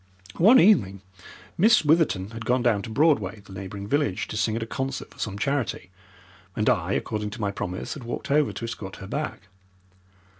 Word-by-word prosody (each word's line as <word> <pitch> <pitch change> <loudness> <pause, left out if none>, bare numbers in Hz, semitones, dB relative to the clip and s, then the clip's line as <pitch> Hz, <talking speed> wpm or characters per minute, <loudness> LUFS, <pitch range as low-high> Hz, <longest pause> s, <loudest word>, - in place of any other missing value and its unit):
One 225 +10 +7
evening 100 - +4 0.6
Miss 215 -3 +5
Witherton 145 - +2
had 115 0 -7
gone 125 +1 +1
down 115 -5 +2
to 110 - -7
Broadway, 110 - +1
the 95 -1 -14
neighbouring 100 +1 -7
village, 110 -4 0
to - - -5
sing 110 +1 0
at 115 - -2
a - - -4
concert 135 +3 -4
for - - -20
some 100 -2 -3
charity, 115 -6 -2 0.6
and 105 - -1
I, 95 -4 0
according 105 -1 -2
to 110 +3 -9
my 100 -1 0
promise, 90 -2 -4
had 145 - -9
walked 120 +3 -5
over 150 0 +3
to 115 - -6
escort 100 -4 -6
her - - -9
back. 145 +6 -4
115 Hz, 190 wpm, -25 LUFS, 100-140 Hz, 0.6 s, One